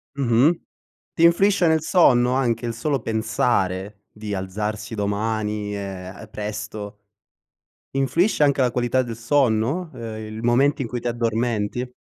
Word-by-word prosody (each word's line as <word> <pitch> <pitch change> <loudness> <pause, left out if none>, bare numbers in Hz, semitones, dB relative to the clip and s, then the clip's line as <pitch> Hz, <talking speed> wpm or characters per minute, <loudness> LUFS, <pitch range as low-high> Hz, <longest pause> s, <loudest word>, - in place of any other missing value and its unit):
Mh-mh. 135 +5 +3 0.5
Ti 165 - 0
influisce 185 +2 +4
nel 160 -1 +3
sonno, 125 -8 +4
anche 120 -3 0
il 115 - -2
solo 135 +3 -1
pensare 105 -3 -1
di 105 -1 -6
alzarsi 105 +4 -4
domani, 105 0 -2
ehm, 95 -2 -7
presto? 105 0 -6 1.0
Influisce 150 +8 +1
anche 140 -2 +4
la 125 - +2
qualità 125 +1 +1
del 115 -2 -6
sonno, 130 +6 +1
ehm, 110 -3 -6
il 110 - -6
momento 135 +4 +3
in 120 - -4
cui 120 +1 -4
ti 120 - -2
addormenti? 115 0 -1
115 Hz, 135 wpm, -23 LUFS, 105-135 Hz, 1.0 s, influisce